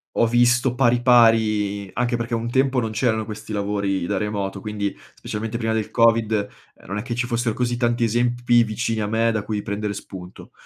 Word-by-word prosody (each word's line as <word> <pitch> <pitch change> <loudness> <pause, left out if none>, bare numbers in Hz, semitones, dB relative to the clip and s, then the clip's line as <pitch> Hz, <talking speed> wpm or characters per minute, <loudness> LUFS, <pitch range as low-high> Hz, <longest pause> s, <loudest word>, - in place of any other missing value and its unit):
ho 115 - +3
visto 120 +1 +3
pari, 120 -2 +3
pari 110 -5 +3
anche 120 0 0
perché 120 0 -3
un 115 +1 -2
tempo 130 0 +2
non 110 -2 -3
c'erano 110 -1 0
questi 110 0 -8
lavori 100 -2 -1
da 100 - -1
remoto, 100 -1 -3
quindi 105 -1 -3 0.2
specialmente 110 +2 -5
prima 110 -1 -1
del 110 -2 -2
Covid, 115 -2 +3 0.4
uhm, - - -19
non 100 +3 -5
è - - -3
che 120 -1 -4
ci 120 +1 -1
fossero 120 -1 -1
così 120 0 -1
tanti 120 0 +1
esempi 120 +1 +2
vicini 110 0 -2
a 105 - -1
me 115 +2 +1
da 110 -2 -1
cui 105 -2 -2
prendere 105 0 -3
spunto, 95 -2 -10
115 Hz, 195 wpm, -22 LUFS, 105-120 Hz, 0.4 s, ho